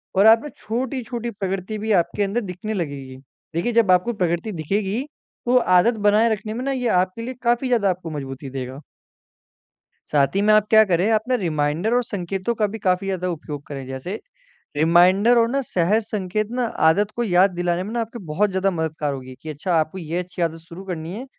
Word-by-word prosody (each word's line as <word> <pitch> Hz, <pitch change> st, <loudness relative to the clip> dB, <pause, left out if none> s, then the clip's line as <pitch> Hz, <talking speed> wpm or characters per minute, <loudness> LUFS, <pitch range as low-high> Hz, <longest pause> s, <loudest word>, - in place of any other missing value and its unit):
और 195 Hz, +2 st, +5 dB
आप 225 Hz, +1 st, +7 dB
ना 295 Hz, -, -6 dB
छोटी-छोटी 240 Hz, 0 st, -3 dB
प्रकृति 195 Hz, 0 st, -4 dB
भी 220 Hz, +1 st, -2 dB
आपके 205 Hz, +4 st, -3 dB
अंदर 200 Hz, +5 st, -1 dB
दिखने 200 Hz, +2 st, -5 dB
लगेगी। 140 Hz, -7 st, -5 dB, 0.4 s
देखिए 175 Hz, +9 st, 0 dB
जब 225 Hz, -5 st, +4 dB
आपको 180 Hz, +7 st, +3 dB
प्रगति 175 Hz, 0 st, -1 dB
दिखेगी 195 Hz, -, -1 dB, 0.4 s
तो 250 Hz, +1 st, +4 dB, 0.2 s
आदत 230 Hz, +7 st, +4 dB
बनाए 215 Hz, +3 st, +4 dB
रखने 215 Hz, +1 st, -5 dB
में 245 Hz, +3 st, -4 dB
ना 275 Hz, -, 0 dB
ये 250 Hz, -2 st, -1 dB
आपके 185 Hz, +4 st, +1 dB
लिए 255 Hz, +3 st, -5 dB
काफ़ी 240 Hz, +2 st, +2 dB
ज़्यादा 230 Hz, -6 st, +2 dB
आपको 180 Hz, -2 st, -3 dB
मज़बूती 135 Hz, -1 st, -6 dB
देगा। 130 Hz, 0 st, -6 dB, 1.3 s
साथ 140 Hz, -2 st, +3 dB
ही -, -, +3 dB
में 215 Hz, +1 st, +4 dB
आप 215 Hz, 0 st, +4 dB
क्या 220 Hz, 0 st, +7 dB
करें, 185 Hz, +1 st, +1 dB
आप 215 Hz, -1 st, +3 dB
ना 255 Hz, -, +2 dB
रिमाइंडर 160 Hz, +6 st, 0 dB
और 245 Hz, -, +3 dB
संकेतों 195 Hz, +1 st, -3 dB
का 215 Hz, -2 st, +1 dB
भी 215 Hz, +2 st, -6 dB
काफ़ी 185 Hz, -1 st, 0 dB
ज़्यादा 185 Hz, -2 st, -2 dB
उपयोग 150 Hz, -3 st, -6 dB
करें। 135 Hz, -3 st, -7 dB
जैसे 135 Hz, +11 st, -5 dB, 0.6 s
रिमाइंडर 180 Hz, +9 st, +5 dB
और 230 Hz, 0 st, +4 dB
ना, 275 Hz, +2 st, 0 dB
सहज 205 Hz, 0 st, +1 dB
संकेत 210 Hz, 0 st, -2 dB
ना, 250 Hz, 0 st, 0 dB
आदत 205 Hz, 0 st, +2 dB
को 240 Hz, -, 0 dB
याद 185 Hz, -1 st, +4 dB
दिलाने 175 Hz, 0 st, -1 dB
में 210 Hz, -, -6 dB
ना 240 Hz, -, 0 dB
आपके 230 Hz, +1 st, -6 dB
बहुत 190 Hz, +7 st, +1 dB
ज़्यादा 190 Hz, +1 st, +1 dB
मददगार 155 Hz, -3 st, -2 dB
होगी 130 Hz, -1 st, -8 dB
कि 155 Hz, -, -8 dB
अच्छा 155 Hz, +5 st, -3 dB
आपको 160 Hz, +3 st, 0 dB
ये 165 Hz, -1 st, -4 dB
अच्छी 180 Hz, 0 st, -6 dB
आदत 165 Hz, -1 st, 0 dB
शुरू 170 Hz, +3 st, -11 dB
करनी 170 Hz, -2 st, -5 dB
है, 235 Hz, +6 st, -6 dB
190 Hz, 205 wpm, -22 LUFS, 165-220 Hz, 1.3 s, आप